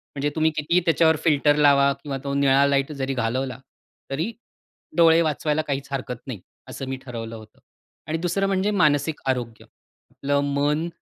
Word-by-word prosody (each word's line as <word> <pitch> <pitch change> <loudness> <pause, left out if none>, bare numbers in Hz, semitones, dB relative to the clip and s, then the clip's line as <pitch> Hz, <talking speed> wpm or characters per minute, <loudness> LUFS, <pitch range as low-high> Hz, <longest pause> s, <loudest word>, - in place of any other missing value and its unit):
म्हणजे 140 +1 -1
तुम्ही 160 0 +2
कितीही 155 +4 +2
त्याच्यावर 160 0 +4
फिल्टर 145 -2 +3
लावा 140 -2 +5
किंवा 140 -2 -4
तो 140 0 -3
निळा 140 0 +4
लाईट 140 +1 +1
जरी 135 -2 -3
घालवला 130 +2 -2 0.5
तरी, 160 +11 -2 0.7
डोळे 165 0 +6
वाचवायला 155 0 0
काहीच 140 -2 -4
हरकत 130 -2 -3
नाही 115 -6 -6 0.3
असं 135 - -6
मी 135 - -3
ठरवलं 115 -2 -6
होतं 110 -1 -14 0.5
आणि 155 +1 -1
दुसरं 180 +4 -1
म्हणजे 195 +1 0
मानसिक 150 -5 +1
आरोग्य, 120 -3 -3 0.5
आपलं 140 +1 -1
मन 150 +3 0
140 Hz, 160 wpm, -23 LUFS, 135-160 Hz, 0.7 s, डोळे